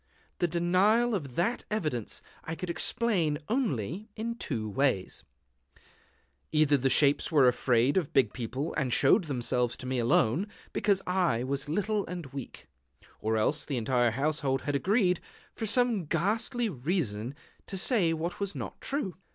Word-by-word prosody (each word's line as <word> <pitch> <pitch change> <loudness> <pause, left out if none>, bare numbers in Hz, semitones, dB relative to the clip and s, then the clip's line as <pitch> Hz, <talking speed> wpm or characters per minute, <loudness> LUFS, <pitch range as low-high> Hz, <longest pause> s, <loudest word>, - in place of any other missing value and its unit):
The 175 - +2
denial 185 +8 +3
of 140 - -3
that 200 +8 0
evidence 155 - -2 0.2
I 160 - -4
could 180 +1 -4
explain 170 -3 0
only 210 - -1
in 230 +1 -3
two 120 - -3
ways: 105 -3 0 1.3
Either 155 -2 +4
the 135 -1 +1
shapes 140 +4 +3
were 140 -5 +6
afraid 125 +3 +2
of 170 -6 0
big 130 -6 +3
people, 130 +5 -4
and 135 -4 -1
showed 170 - +4
themselves 125 -3 -1
to - - -9
me 130 0 -1
alone, 120 - +2 0.3
because 200 -2 +1
I 180 -10 +1
was 140 +2 -2
little 205 +5 0
and 175 -2 -5
weak; 135 -3 -8 0.5
or 110 +1 0
else 145 +8 +1
the 140 - -3
entire 120 +1 +2
household 135 +1 0
had 145 - -1
agreed, 180 - +2 0.3
for 220 - -4
some 230 -5 +2
ghastly 220 - 0
reason, 135 - -2 0.3
to 195 - -4
say 190 -4 +2
what 165 +2 -3
was 200 -1 -3
not - - -6
true. 275 -10 -2
155 Hz, 150 wpm, -29 LUFS, 130-195 Hz, 1.3 s, were